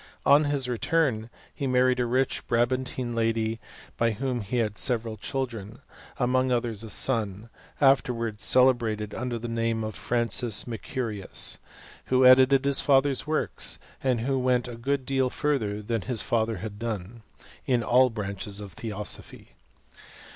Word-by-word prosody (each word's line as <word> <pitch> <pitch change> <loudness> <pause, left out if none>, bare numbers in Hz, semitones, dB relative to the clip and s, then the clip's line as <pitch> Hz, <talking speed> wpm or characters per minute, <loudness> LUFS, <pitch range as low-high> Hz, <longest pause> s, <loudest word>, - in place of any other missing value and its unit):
On 145 +2 +6
his 140 -3 0
return, 125 -2 0 0.2
he 140 - -3
married 125 0 +3
a 120 - +1
rich 130 +2 0
Bra 120 0 +3
bantine 130 -1 -3
lady, 115 -1 0 0.4
by 115 -1 +2
whom 125 +1 -2
he 105 +5 -3
had 110 -3 0
several 115 -3 -1
children; 115 -4 -5 0.4
among 130 0 +1
others 120 -3 -1
a 110 - -7
son, 110 -2 0 0.3
afterwards 120 -6 +2
celiebrated 115 -5 +2
under 120 -1 -3
the 120 +1 -5
name 115 -1 -1
of 110 0 -4
Francis 120 -1 0
Mercurius, 115 -3 -2 0.5
who 130 0 +3
edited 130 +1 +6
his 140 -1 +3
father's 140 0 +2
works, 155 0 0 0.3
and 125 -4 +1
who 135 +2 0
went 125 -1 +1
a 120 - -7
good 130 +3 -2
deal 135 -1 +1
further 110 -8 -1
than 115 0 -1
his 105 +4 -1
father 115 -1 0
had 105 -2 -7
done, 110 -1 -5 0.5
in 125 -3 +2
all 125 +2 +4
the 115 - -14
branches 100 -1 -4
of 100 -3 -9
theosophy. 105 -1 -6
120 Hz, 150 wpm, -27 LUFS, 110-130 Hz, 0.5 s, On